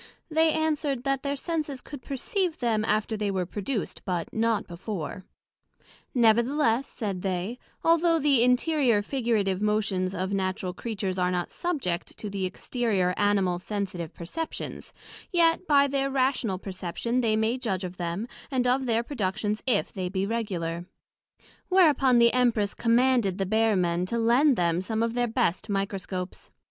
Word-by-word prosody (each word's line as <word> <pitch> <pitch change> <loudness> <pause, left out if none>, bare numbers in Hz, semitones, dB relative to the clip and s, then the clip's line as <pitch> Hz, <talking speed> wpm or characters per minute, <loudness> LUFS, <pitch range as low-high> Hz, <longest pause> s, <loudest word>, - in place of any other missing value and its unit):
They 320 +1 +4
answer'd, 300 -5 0
That 275 -1 0
their 280 0 -2
Senses 300 -2 -3
could 280 +1 -10
perceive 330 - -2
them 225 -3 +1
after 215 0 0
they 210 -1 -1
were 190 -2 -1
produced, 205 +5 -4
but 175 -3 -3
not 225 -1 +1
before; 180 0 -6 0.9
Nevertheless, 235 +2 +3
said 200 -6 -4
they, 190 +6 -2 0.2
although 335 0 +4
the 280 -5 +3
interior, 250 -3 +3
figurative 215 -6 0
motions 200 -3 0
of 190 +2 -2
Natural 185 -1 -1
Creatures 195 -3 -3
are 180 0 +2
not 180 -1 -2
subject 270 - -3
to 210 - -6
the 195 -1 -2
exterior, 195 -2 0
animal, 195 -4 +2
sensitive 185 -4 -4
perceptions, 305 - -6 0.4
yet 340 +1 +3
by 280 -2 +5
their 275 0 0
Rational 255 -7 +1
perception 195 +6 -2
they 220 -3 +2
may 220 +3 +1
judg 195 -7 -2
of 180 0 -6
them, 175 +6 -3 0.2
and 255 -3 0
of 255 +1 +2
their 230 0 +2
productions 215 -4 -2
if 230 -6 +1
they 185 -2 -3
be 190 +1 -1
regular: 180 -6 -3 0.8
Whereupon 295 -9 +5
the 235 0 +5
Empress 235 -5 +2
commanded 235 -4 +2
the 195 - 0
Bear 220 +2 +2
men 175 -1 +1
to 235 - -2
lend 245 +5 +4
them 170 -2 +1
some 220 +3 -1
of 230 0 -1
their 245 0 +1
best 225 -4 0
Microscopes. 195 -2 -3
220 Hz, 155 wpm, -27 LUFS, 190-260 Hz, 0.9 s, by